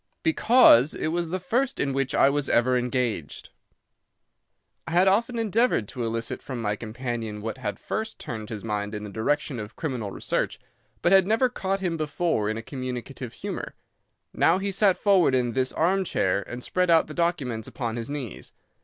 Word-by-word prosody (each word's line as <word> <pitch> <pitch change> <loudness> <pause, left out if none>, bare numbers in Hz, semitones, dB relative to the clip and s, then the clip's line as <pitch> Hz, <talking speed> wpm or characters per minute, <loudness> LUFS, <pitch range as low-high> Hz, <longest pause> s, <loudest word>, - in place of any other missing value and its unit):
"Because 235 - +6
it - - -1
was 170 0 -1
the 185 +2 -2
first 250 +8 -1
in 140 -1 0
which 135 -1 -1
I - - +5
was 145 0 0
ever 125 +2 +3
engaged." 125 - -2 1.4
I - - -4
had 180 +2 +5
often 230 +5 +2
endeavoured 225 - +1
to 125 - -4
elicit 115 0 -3
from 130 -3 -6
my 105 -2 -1
companion 115 -1 -5
what 110 +4 -5
had 105 -5 -3
first 220 0 -4
turned 110 -3 -6
his 105 -3 -6
mind 105 -1 -3
in 105 - -5
the 105 - -7
direction 130 +4 -1
of 105 +1 -8
criminal 125 -9 -3
research, - - -2 0.4
but 175 - +3
had 190 -1 +6
never 230 +4 +3
caught 195 -4 -2
him 175 -3 -1
before 155 -8 0
in 110 - -2
a 115 - -6
communicative 130 -1 -6
humour. - - -6 0.6
Now - - +3
he 200 +1 -2
sat 195 -1 +3
forward 190 -9 +4
in 120 -2 0
this 130 +1 0
armchair 165 - +1
and 120 +1 -6
spread 180 -1 0
out 165 -1 +5
the 155 - -9
documents 140 -11 -1
upon 115 -4 -4
his 115 +1 -5
knees. 140 -7 -6
135 Hz, 180 wpm, -26 LUFS, 115-180 Hz, 1.4 s, Because